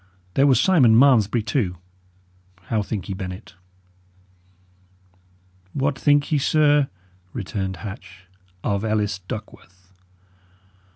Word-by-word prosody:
There 140 Hz, +1 st, +4 dB
was 130 Hz, -4 st, +4 dB
Simon 130 Hz, -10 st, +5 dB
Malmesbury, 120 Hz, -4 st, +4 dB
too. 105 Hz, -5 st, -1 dB, 0.9 s
How 110 Hz, +3 st, -1 dB
think 100 Hz, -3 st, -5 dB
ye, 100 Hz, -, -3 dB
Bennet?" 95 Hz, +1 st, -7 dB, 2.2 s
"What 140 Hz, 0 st, 0 dB
think 145 Hz, +1 st, +2 dB
ye, 150 Hz, -, +3 dB
sir," 145 Hz, -1 st, +3 dB, 0.4 s
returned 95 Hz, -3 st, -4 dB
Hatch, 95 Hz, -3 st, -10 dB, 0.4 s
"of 100 Hz, 0 st, -1 dB
Ellis 105 Hz, -2 st, -1 dB
Duckworth?" 95 Hz, -2 st, -10 dB
110 Hz, 100 wpm, -22 LUFS, 95-135 Hz, 2.2 s, Simon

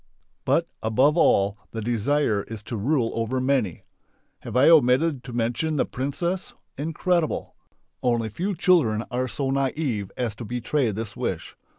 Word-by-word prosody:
But, -, -, +2 dB, 0.2 s
above 130 Hz, +7 st, +3 dB
all, 100 Hz, -, +3 dB
the 115 Hz, -, -6 dB
desire 120 Hz, 0 st, +1 dB
is 110 Hz, -2 st, -7 dB
to 115 Hz, -, -5 dB
rule 120 Hz, +2 st, +1 dB
over 115 Hz, +3 st, -1 dB
many. 125 Hz, -, 0 dB, 0.6 s
Have 125 Hz, -, -4 dB
I 130 Hz, -, +6 dB
omitted 145 Hz, -2 st, +4 dB
to 125 Hz, -, -7 dB
mention 120 Hz, +7 st, -1 dB
the -, -, +2 dB
"princess"? 170 Hz, +8 st, -3 dB, 0.2 s
Incredible! 165 Hz, +3 st, -1 dB, 0.5 s
Only 120 Hz, -3 st, +1 dB
few 185 Hz, -, -2 dB
children 155 Hz, -, +3 dB
are 125 Hz, +1 st, -1 dB
so 135 Hz, +3 st, -2 dB
naive 135 Hz, -6 st, -1 dB
as 120 Hz, -4 st, -1 dB
to -, -, -6 dB
betray 125 Hz, +3 st, 0 dB
this 105 Hz, 0 st, -5 dB
wish. -, -, -4 dB
125 Hz, 150 wpm, -25 LUFS, 115-150 Hz, 0.6 s, I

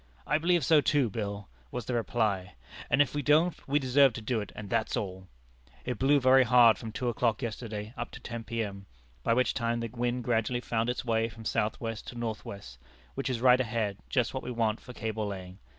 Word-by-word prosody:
'I 150 Hz, -, +2 dB
believe 175 Hz, +1 st, +2 dB
so 155 Hz, -2 st, +5 dB
too, 140 Hz, -6 st, +2 dB
Bill,' 100 Hz, -2 st, -4 dB, 0.2 s
was 125 Hz, -3 st, -5 dB
the 125 Hz, -, -3 dB
reply; 105 Hz, -6 st, -1 dB, 0.3 s
'and 140 Hz, -, +5 dB
if 145 Hz, -, -9 dB
we 145 Hz, -, -1 dB
don't, 155 Hz, +5 st, +3 dB
we 140 Hz, +1 st, +2 dB
deserve 135 Hz, -1 st, +4 dB
to -, -, -5 dB
do 110 Hz, 0 st, 0 dB
it, 105 Hz, -, -7 dB
and 105 Hz, -, -7 dB
that's 110 Hz, +2 st, 0 dB
all.' 95 Hz, -2 st, -5 dB, 0.6 s
It 125 Hz, -, -3 dB
blew 140 Hz, +2 st, +4 dB
very 130 Hz, 0 st, +6 dB
hard 120 Hz, -3 st, +6 dB
from 110 Hz, -, -6 dB
two 125 Hz, +3 st, -3 dB
o'clock 120 Hz, 0 st, 0 dB
yesterday, 110 Hz, -1 st, -5 dB
up 120 Hz, 0 st, -4 dB
to -, -, -8 dB
10 115 Hz, -2 st, -6 dB
P.M., 100 Hz, -4 st, -4 dB, 0.3 s
by 115 Hz, -, +2 dB
which 130 Hz, +1 st, +2 dB
time 115 Hz, -1 st, -1 dB
the 115 Hz, 0 st, -3 dB
wind 120 Hz, +1 st, -2 dB
gradually 120 Hz, +1 st, 0 dB
found 115 Hz, -1 st, -1 dB
its 125 Hz, -, -3 dB
way 115 Hz, -1 st, +1 dB
from 110 Hz, 0 st, -12 dB
south 105 Hz, 0 st, 0 dB
west 115 Hz, -2 st, -5 dB
to 120 Hz, -, -7 dB
north 115 Hz, -2 st, -3 dB
west, 65 Hz, -12 st, -9 dB, 0.3 s
which 135 Hz, 0 st, -3 dB
is 120 Hz, -3 st, -2 dB
right 125 Hz, 0 st, +6 dB
ahead, 110 Hz, -4 st, -2 dB
just 125 Hz, -4 st, +1 dB
what 130 Hz, -, -3 dB
we -, -, -6 dB
want 115 Hz, -2 st, 0 dB
for -, -, -11 dB
cable 110 Hz, -3 st, -3 dB
laying. 95 Hz, -1 st, -7 dB
115 Hz, 220 wpm, -29 LUFS, 110-125 Hz, 0.6 s, very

